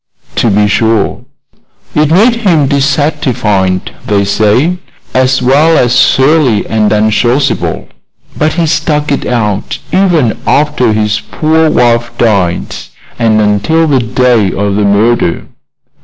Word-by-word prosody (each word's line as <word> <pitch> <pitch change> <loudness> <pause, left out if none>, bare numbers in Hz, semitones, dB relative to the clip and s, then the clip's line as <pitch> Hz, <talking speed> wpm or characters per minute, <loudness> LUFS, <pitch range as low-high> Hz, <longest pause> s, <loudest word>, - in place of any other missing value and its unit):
"To 115 - +1
be 105 +1 +2
sure." 110 0 -1 0.7
"It 150 0 +1
made 220 +8 +3
him 175 -10 +1
dissatisfied, 135 - -1 0.2
they 100 -3 +1
say, 110 - +1 0.3
as 130 0 +1
well 150 +6 +3
as 120 0 +1
surly 135 -6 +2
and 110 -1 0
unsociable; 120 +5 0 0.5
but 155 +1 -1
he 170 -1 0
stuck 150 -1 -1
it 140 - -2
out 105 -4 -2 0.2
even 175 - +1
after 145 -5 +1
his 105 0 -1
poor 160 0 +1
wife 120 -3 +1
died, 100 -7 0 0.4
and 110 -2 +2
until 105 +11 +1
the 140 -4 +1
day 125 -3 +1
of 100 +1 -2
the 105 0 0
murder." 100 -2 0
125 Hz, 125 wpm, -10 LUFS, 105-150 Hz, 0.7 s, made